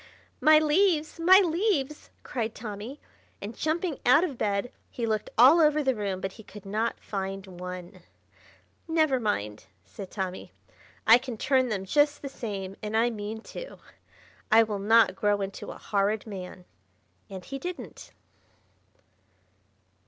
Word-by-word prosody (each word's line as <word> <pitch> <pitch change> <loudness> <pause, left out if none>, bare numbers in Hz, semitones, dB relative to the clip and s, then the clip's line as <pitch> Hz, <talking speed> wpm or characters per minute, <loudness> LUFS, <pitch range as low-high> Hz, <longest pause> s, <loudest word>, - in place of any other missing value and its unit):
"My 310 0 +7
leaves! 310 +1 +2
My 370 +4 +7
leaves!" 330 -5 -1
cried 225 -2 -3
Tommy; 220 +5 -7 0.4
and 210 +3 -7
jumping 320 0 -2
out 290 +7 +5
of 315 -7 -2
bed 205 +1 -1 0.2
he 235 - -4
looked 215 -1 -1
all 270 +9 +8
over 300 -1 +3
the 265 -1 +2
room, 200 -4 -3
but 195 - -3
he 220 - -13
could 205 -1 -13
not 215 +4 -2
find 195 -1 -5
one. 180 -1 -8 0.9
"Never 315 -5 +2
mind," 105 - -2 0.2
said 180 - -9
Tommy. 185 - -5 0.5
"I 230 +2 +8
can 245 -2 -7
turn 260 +1 +2
them 195 -3 -3
just 290 +7 +2
the 275 - -4
same, 195 -6 -6
and 215 +1 -2
I 235 +2 +3
mean 215 0 -6
to. - - -8 0.7
I 225 +1 +7
will 210 -2 -3
not 225 0 +4
grow 205 +1 +1
into 195 0 -5
a - - -8
Horrid 205 +1 -1
Man." 185 -3 -8 0.6
And 190 -2 -8
he 275 0 -6
didn't. 355 +3 -8
225 Hz, 145 wpm, -27 LUFS, 200-295 Hz, 0.9 s, all